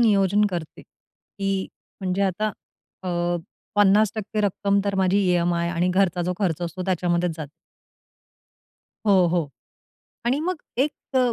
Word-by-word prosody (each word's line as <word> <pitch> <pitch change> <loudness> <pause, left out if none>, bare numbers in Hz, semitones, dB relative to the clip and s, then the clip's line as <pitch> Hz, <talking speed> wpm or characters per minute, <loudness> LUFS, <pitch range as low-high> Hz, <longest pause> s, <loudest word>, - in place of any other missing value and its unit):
नियोजन 205 -2 +4
करते, 170 -4 -5
की 195 -1 -5 0.3
म्हणजे 190 +1 0
आता 200 +3 0 0.5
अ, - - -2 0.7
50% 210 +1 +3
रक्कम 200 0 +1
तर 200 - 0
माझी 190 +1 +3
ई-एम-आय 175 -2 +2
आणि 175 +1 +1
घरचा 185 -2 +2
जो 180 +1 0
खर्च 175 -5 0
असतो 175 +2 -4
त्याच्यामध्येच 175 -1 +1
जाते. 150 -3 -6 1.6
हो, 190 -3 +5
हो. 165 -4 0 0.8
आणि 270 +5 +2
मग 355 -1 -2 0.2
एक 285 +3 +2 0.2
अ, 250 -2 +4
190 Hz, 125 wpm, -24 LUFS, 175-205 Hz, 1.6 s, हो